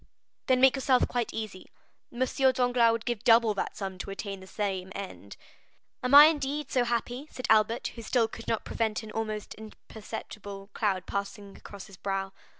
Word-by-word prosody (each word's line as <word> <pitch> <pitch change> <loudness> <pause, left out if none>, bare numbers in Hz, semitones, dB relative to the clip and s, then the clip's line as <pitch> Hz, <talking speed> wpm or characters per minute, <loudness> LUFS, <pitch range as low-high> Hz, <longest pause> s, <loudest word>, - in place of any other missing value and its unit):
"Then 255 -1 +4
make 265 +1 +6
yourself 265 -1 +2
quite 245 -2 -2
easy. 215 -4 -6 0.4
M. 245 +2 -1 0.3
Danglars 245 -2 +3
would 230 0 -3
give 240 -4 -2
double 230 -2 +5
that 200 - -4
sum 190 -2 -5
to - - -6
attain 195 0 -5
the 190 - -13
same 190 -2 -3
end." 195 -1 -8 0.6
"Am 250 +2 +3
I, 290 +1 +12
indeed, 295 -2 0
so 250 -2 +2
happy?" 240 +4 -2
said 255 - -6
Albert, 220 +2 +3
who 230 - -9
still 230 0 +1
could 230 - -10
not 225 - -1
prevent 220 -1 -2
an 215 - -9
almost 215 -1 -4
imperceptible 210 -2 -9
cloud 190 -4 -1
passing 200 0 -5
across 200 -2 -11
his 195 -3 -14
brow. 195 0 -3
220 Hz, 175 wpm, -28 LUFS, 200-245 Hz, 0.6 s, I